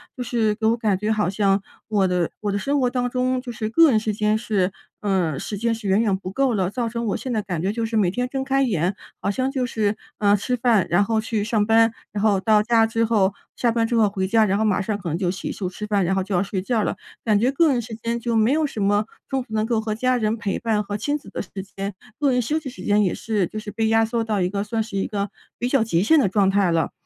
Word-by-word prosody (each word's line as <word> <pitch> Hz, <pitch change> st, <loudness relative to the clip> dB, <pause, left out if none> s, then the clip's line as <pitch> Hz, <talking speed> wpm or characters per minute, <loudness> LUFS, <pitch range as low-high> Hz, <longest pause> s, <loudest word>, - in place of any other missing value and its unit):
就 250 Hz, -, -6 dB
是 230 Hz, -3 st, +1 dB
给 220 Hz, +1 st, -1 dB
我 230 Hz, +1 st, +3 dB
感 215 Hz, -4 st, +1 dB
觉， 215 Hz, +1 st, 0 dB
好 210 Hz, -4 st, +1 dB
像 195 Hz, 0 st, +1 dB, 0.2 s
我 200 Hz, -4 st, +2 dB
的 180 Hz, -2 st, 0 dB
我 205 Hz, -1 st, -1 dB
的 200 Hz, -, -1 dB
生 280 Hz, +7 st, 0 dB
活 250 Hz, -, +2 dB
当 245 Hz, -1 st, 0 dB
中， 255 Hz, 0 st, 0 dB
就 245 Hz, -2 st, -6 dB
是 220 Hz, -2 st, -3 dB
个 325 Hz, +7 st, +6 dB
人 220 Hz, -4 st, +3 dB
时 215 Hz, -1 st, -2 dB
间 215 Hz, +1 st, +1 dB
是 200 Hz, -5 st, 0 dB, 0.3 s
呃， 185 Hz, -8 st, 0 dB
时 205 Hz, -, -5 dB
间 230 Hz, +2 st, 0 dB
是 220 Hz, -3 st, -5 dB
远 195 Hz, +3 st, +4 dB
远 205 Hz, -4 st, +2 dB
不 185 Hz, -1 st, -6 dB
够 265 Hz, +2 st, +1 dB
了， 185 Hz, -3 st, 0 dB
造 235 Hz, +3 st, -2 dB
成 235 Hz, +1 st, -3 dB
我 -, -, 0 dB
现 255 Hz, -, -4 dB
在 215 Hz, -, 0 dB
感 180 Hz, -5 st, -4 dB
觉 195 Hz, -, +1 dB
就 230 Hz, -, -2 dB
是 225 Hz, -, -1 dB
每 190 Hz, -5 st, +3 dB
天 250 Hz, +4 st, -2 dB
睁 270 Hz, -1 st, -2 dB
开 270 Hz, 0 st, +1 dB
眼， 190 Hz, -, +1 dB, 0.2 s
好 200 Hz, -, -1 dB
像 260 Hz, +5 st, -1 dB
就 260 Hz, -2 st, -1 dB
是， 215 Hz, -3 st, -1 dB, 0.2 s
呃， 205 Hz, -1 st, +4 dB
吃 250 Hz, +5 st, -1 dB
饭， 230 Hz, -5 st, +3 dB
然 195 Hz, +4 st, +4 dB
后 220 Hz, +1 st, 0 dB
去 220 Hz, -1 st, -1 dB
上 215 Hz, -2 st, +1 dB
班， 225 Hz, 0 st, +4 dB, 0.2 s
然 205 Hz, 0 st, -3 dB
后 205 Hz, -3 st, +3 dB
到 215 Hz, +1 st, +4 dB
家 225 Hz, 0 st, +3 dB
之 225 Hz, +1 st, 0 dB
后 205 Hz, -4 st, +2 dB, 0.2 s
下 240 Hz, -2 st, +1 dB
班 225 Hz, -1 st, +1 dB
之 235 Hz, -, -1 dB
后 220 Hz, -2 st, +4 dB
回 190 Hz, -2 st, -2 dB
家， 220 Hz, +1 st, +4 dB
然 195 Hz, 0 st, +1 dB
后 220 Hz, -, +2 dB
马 200 Hz, -2 st, +2 dB
上 210 Hz, +2 st, -2 dB
可 180 Hz, -4 st, -5 dB
能 160 Hz, -, -1 dB
就 180 Hz, -2 st, 0 dB
洗 190 Hz, -, -5 dB
漱 185 Hz, -3 st, -4 dB
吃 210 Hz, +3 st, -7 dB
饭， 205 Hz, -2 st, +1 dB
然 190 Hz, -, +1 dB
后 190 Hz, -, 0 dB
就 190 Hz, -1 st, -3 dB
要 175 Hz, -, +2 dB
睡 195 Hz, -1 st, -3 dB
觉 220 Hz, +2 st, 0 dB
了。 -, -, -1 dB, 0.3 s
感 215 Hz, -3 st, +3 dB
觉 245 Hz, +5 st, +2 dB
个 310 Hz, +1 st, +3 dB
人 245 Hz, -2 st, +1 dB
时 225 Hz, 0 st, -7 dB
间， 230 Hz, +1 st, -3 dB
就 235 Hz, 0 st, -1 dB
没 220 Hz, +3 st, +3 dB
有 310 Hz, +1 st, +2 dB
什 220 Hz, -6 st, -5 dB
么 205 Hz, +1 st, +2 dB, 0.2 s
中 270 Hz, -1 st, 0 dB
途 245 Hz, -3 st, -11 dB
能 215 Hz, 0 st, +1 dB
够 230 Hz, -1 st, +1 dB
和 215 Hz, -1 st, -2 dB
家 255 Hz, +2 st, +1 dB
人 220 Hz, -1 st, 0 dB
陪 210 Hz, -3 st, -3 dB
伴 220 Hz, -2 st, 0 dB
和 205 Hz, 0 st, -4 dB
亲 290 Hz, +7 st, -1 dB
子 300 Hz, -, -14 dB
的 -, -, -4 dB
时 185 Hz, -, -10 dB, 0.3 s
间， 195 Hz, 0 st, -3 dB, 0.3 s
个 285 Hz, -3 st, +3 dB
人 250 Hz, -, +2 dB
休 300 Hz, +7 st, -1 dB
息 290 Hz, -, -7 dB
时 260 Hz, -, -11 dB
间 210 Hz, 0 st, +3 dB
也 185 Hz, -, +1 dB
是 210 Hz, -5 st, -1 dB
就 215 Hz, -, -8 dB
是 210 Hz, -1 st, -6 dB
被 225 Hz, -1 st, 0 dB
压 225 Hz, 0 st, +4 dB
缩 230 Hz, +1 st, -1 dB
到 210 Hz, -4 st, 0 dB
一 180 Hz, -, +1 dB
个， 200 Hz, +1 st, -2 dB
算 220 Hz, +1 st, -1 dB
是 215 Hz, -2 st, -6 dB
一 195 Hz, -, 0 dB
个 200 Hz, -2 st, -2 dB, 0.3 s
比 245 Hz, -, -2 dB
较 270 Hz, -1 st, +3 dB
极 180 Hz, -6 st, +1 dB
限 315 Hz, +9 st, +5 dB
的 250 Hz, -, +3 dB
状 195 Hz, 0 st, +2 dB
态 195 Hz, -3 st, +2 dB
了， 165 Hz, -1 st, +1 dB
215 Hz, 315 characters per minute, -23 LUFS, 200-235 Hz, 0.3 s, 个